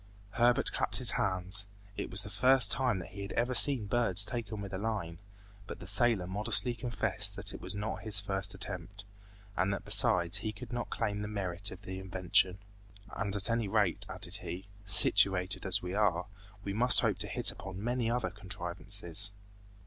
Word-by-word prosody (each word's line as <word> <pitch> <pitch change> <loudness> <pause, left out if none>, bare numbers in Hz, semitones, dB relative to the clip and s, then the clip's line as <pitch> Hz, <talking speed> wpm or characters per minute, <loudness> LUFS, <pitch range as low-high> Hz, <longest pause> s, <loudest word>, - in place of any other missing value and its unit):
Herbert 120 +3 +2
clapped - - +3
his - - +4
hands. 95 +1 -1 0.3
It - - -5
was 95 +3 +5
the 105 - -10
first 130 +5 +5
time 125 -5 +1
that 90 - -8
he 100 +1 -10
had 100 - -6
ever 120 +2 -1
seen 125 -2 +6
birds 100 -3 +3
taken 110 -3 -6
with 100 -1 -8
a 95 - -4
line, 100 -6 -4 0.5
but - - -8
the - - -10
sailor 100 0 +1
modestly 105 +4 0
confessed 120 0 -3
that - - -6
it - - -10
was - - -5
not 105 +2 -5
his 105 -3 +2
first 95 -1 -4
attempt, 95 +1 -8 0.5
and 95 +3 0
that 100 - -5
besides 90 +2 +5
he 110 +1 -5
could 120 +3 -10
not 120 0 -4
claim 105 0 -3
the 105 - -5
merit 100 -2 -2
of 95 +2 -12
invention. 95 0 0 0.6
"And 100 0 -3
at 100 0 -1
any 115 -2 -1
rate," 100 -3 0
added - - -2
he, 90 +3 -8 0.2
"situated 95 -1 +3
as 95 0 +1
we 90 0 -5
are, 95 -4 0 0.4
we 100 - -4
must 125 +4 +5
hope - - -1
to - - -2
hit - - +4
upon 95 +1 -9
many 120 -1 -1
other 120 -1 -2
contrivances." 95 -1 -4
100 Hz, 185 wpm, -31 LUFS, 95-110 Hz, 0.6 s, seen